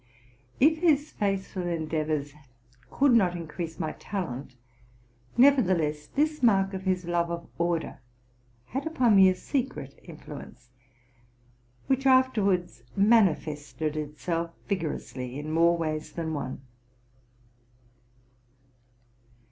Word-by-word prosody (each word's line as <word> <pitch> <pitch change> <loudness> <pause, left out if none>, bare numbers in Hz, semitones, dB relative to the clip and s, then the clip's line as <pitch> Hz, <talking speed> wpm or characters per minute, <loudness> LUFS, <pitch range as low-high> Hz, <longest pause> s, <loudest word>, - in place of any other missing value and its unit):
If 315 +4 +4
his 310 -3 +2
faithful 195 -2 -2
endeavors 155 -3 -2 0.6
could 275 -2 +3
not 185 -6 +4
increase 165 0 -6
my 160 -3 -2
talent, 140 -10 -5 0.8
nevertheless 180 - +3
this 305 +1 0
mark 195 -5 +3
of 190 0 -5
his 185 -1 0
love 170 0 0
of 170 0 -5
order 170 -3 -1 0.7
had 270 - -4
upon 250 -9 +3
me 190 -1 +8
a 185 - +1
secret 235 - -4
influence, 150 -6 -11 1.1
which 270 0 +1
afterwards 205 - +2
manifested 160 -8 +2
itself 155 +3 -3 0.2
vigor 180 -6 -1
ously 125 0 -7
in 150 +1 -5
more 170 +1 +4
ways 155 -2 -3
than 160 -2 -3
one. 130 -4 -4
175 Hz, 105 wpm, -27 LUFS, 155-220 Hz, 1.1 s, me